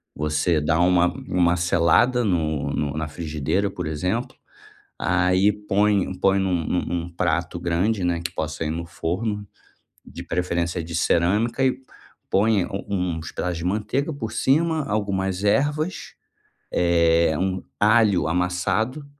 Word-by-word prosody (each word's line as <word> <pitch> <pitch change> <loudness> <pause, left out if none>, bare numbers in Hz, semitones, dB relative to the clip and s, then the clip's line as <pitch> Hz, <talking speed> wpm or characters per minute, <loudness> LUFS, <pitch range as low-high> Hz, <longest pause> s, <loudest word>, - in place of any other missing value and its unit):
você 75 +2 +1
dá 80 +2 +1
uma 90 0 +4 0.2
uma 90 -1 +3
selada 90 +8 +3
no 80 -6 0
no 75 -1 -2
na 75 - -2
frigideira, 80 +4 -2
por - - -5
exemplo, 90 - -2 0.6
aí 95 +3 +2
põe 105 -2 0
põe 95 0 +3
num 90 -4 0
num 90 - 0
num 85 0 -3
prato 85 0 -1
grande, 90 +4 0
né, 85 -1 0
que 85 - -4
possa 80 -1 -3
ir 75 - -2
no 85 +1 -4
forno, 105 +5 -3 0.6
de - - -9
preferência 85 0 -2
de 85 +1 -8
cerâmica 105 +10 +1
e 130 0 +1 0.5
põe 100 -1 +2
u 100 - -5
uns 90 -4 -2
pedaços 90 -1 -3
de 85 - -6
manteiga 115 - -1
por 110 -6 -5
cima, 160 +3 +2
algumas 95 -2 -1
ervas, 145 - 0 0.6
eh, 85 -2 +3
um 95 0 -1 0.2
alho 105 -4 +4
amassado 95 - -1
90 Hz, 140 wpm, -23 LUFS, 85-105 Hz, 0.6 s, uma